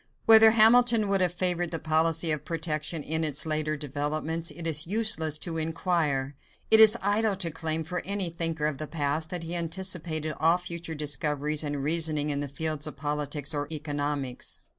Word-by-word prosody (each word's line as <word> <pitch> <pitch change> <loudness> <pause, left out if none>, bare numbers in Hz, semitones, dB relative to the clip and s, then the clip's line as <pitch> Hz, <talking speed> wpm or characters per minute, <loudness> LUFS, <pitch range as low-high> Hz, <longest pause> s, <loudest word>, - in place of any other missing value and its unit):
Whether 225 0 +8
Hamilton 230 0 +5
would 195 -1 +1
have 180 -2 +1
favored 175 -1 +1
the 165 - -4
policy 160 +1 +1
of 150 -2 -1
protection 155 -1 -3
in 160 +2 -1
its 150 -1 0
later 155 -1 -1
developments, 150 +3 -3
it 170 - -8
is 155 -1 -2
useless 195 -7 +2
to 165 +1 -5
inquire. 155 -4 -1 0.4
It 220 - +8
is 220 +1 +8
idle 205 +1 +1
to 175 -3 -2
claim 160 0 -1
for 180 +3 -4
any 195 -3 -2
thinker 165 -2 -3
of 150 -3 -2
the 155 - -5
past 155 +1 -3
that 175 -2 -4
he 165 +1 -6
anticipated 165 -2 -2
all 165 +2 +3
future 170 -2 -6
discoveries 150 0 -1
and 145 -2 -4
reasoning 155 -1 +2
in 140 - -2
the 145 - -3
fields 155 +1 -4
of 155 - -9
politics 145 0 -3
or 145 -1 -3
economics. 145 -4 -3
160 Hz, 180 wpm, -27 LUFS, 150-175 Hz, 0.4 s, Whether